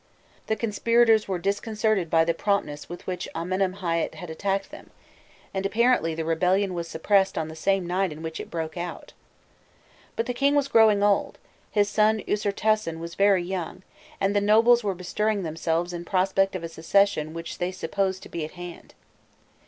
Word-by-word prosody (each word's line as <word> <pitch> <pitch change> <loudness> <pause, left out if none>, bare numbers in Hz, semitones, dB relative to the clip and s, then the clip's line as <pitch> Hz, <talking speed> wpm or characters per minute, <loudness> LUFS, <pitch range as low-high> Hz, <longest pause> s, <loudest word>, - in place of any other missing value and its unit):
The 220 - +1
conspirators 225 +1 +3
were 190 -2 -1
disconcerted 205 0 0
by 165 0 +4
the 170 - +1
promptness 165 -6 -2
with 175 - -8
which 180 -1 -4
Amenemhâît 180 0 -1
had 175 -3 -8
attacked 195 +3 -2
them, - - -12 0.6
and 190 0 -2
apparently 215 -5 +2
the 160 0 -3
rebellion 185 +4 +1
was 170 -1 -4
suppressed 190 +4 +1
on 160 -1 -2
the 160 - -9
same 195 +3 +1
night 185 +1 0
in 155 +2 -9
which 160 0 -5
it - - -7
broke 160 -1 -4
out. 175 0 -6 1.0
But 230 - -1
the 245 - -2
king 280 +3 +2
was 285 -1 +2
growing 215 -4 +5
old, 205 -1 +1 0.3
his 205 -1 +2
son 215 +1 +2
Usirtasen 210 -3 0
was 170 0 -7
very 195 -2 +3
young, 185 0 -5 0.4
and 195 +1 +1
the 205 - +3
nobles 225 +3 +5
were 200 -2 -1
bestirring 205 +3 -1
themselves 165 +2 -2
in 170 0 -5
prospect 195 +1 +1
of 180 - -4
a - - -3
succession 165 -1 +1
which 165 0 -6
they 180 +1 -1
supposed 190 +1 -2
to - - -11
be 170 - -4
at 155 - -7
hand. 175 -1 -10
190 Hz, 175 wpm, -25 LUFS, 170-205 Hz, 1.0 s, growing